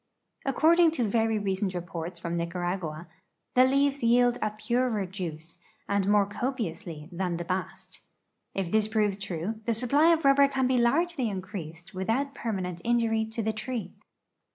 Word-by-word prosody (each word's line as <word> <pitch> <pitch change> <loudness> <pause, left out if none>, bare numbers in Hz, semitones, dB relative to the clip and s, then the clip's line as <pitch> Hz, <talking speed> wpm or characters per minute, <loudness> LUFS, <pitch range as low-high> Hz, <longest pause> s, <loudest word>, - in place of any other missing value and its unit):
According 325 +5 +5
to 255 - 0
ver}^ 225 +2 +2 0.2
recent 190 0 -1
re[)orts 170 -1 -5
from 170 0 -3
Nicaragua, 170 -1 -3 0.5
the 255 +1 +6
leaves 275 +1 +2
jdeld 245 0 +3
a 215 - +1
purer 215 0 0
juice, 170 -3 -7 0.3
and 200 -1 +1
more 205 -1 +4
copiously, 205 - -4
than 175 -1 -2
the 175 - -5
bast. 185 +2 -5 0.5
If 190 -3 -2
this 215 -1 +3
proves 210 -2 0
true, 200 +3 -4
the 235 - +1
sui)ply 280 +8 +4
of 325 -3 +1
rubber 275 0 +6
can 265 -2 0
be 255 -1 +2
largely 275 +1 +2
increased 185 -3 -7
with 190 +2 -4
out 275 +4 0
permanent 185 -8 -4
injury 230 -2 +2
to 225 +1 -3
the 220 +1 0
tree. 235 +2 -4
215 Hz, 155 wpm, -28 LUFS, 180-250 Hz, 0.5 s, the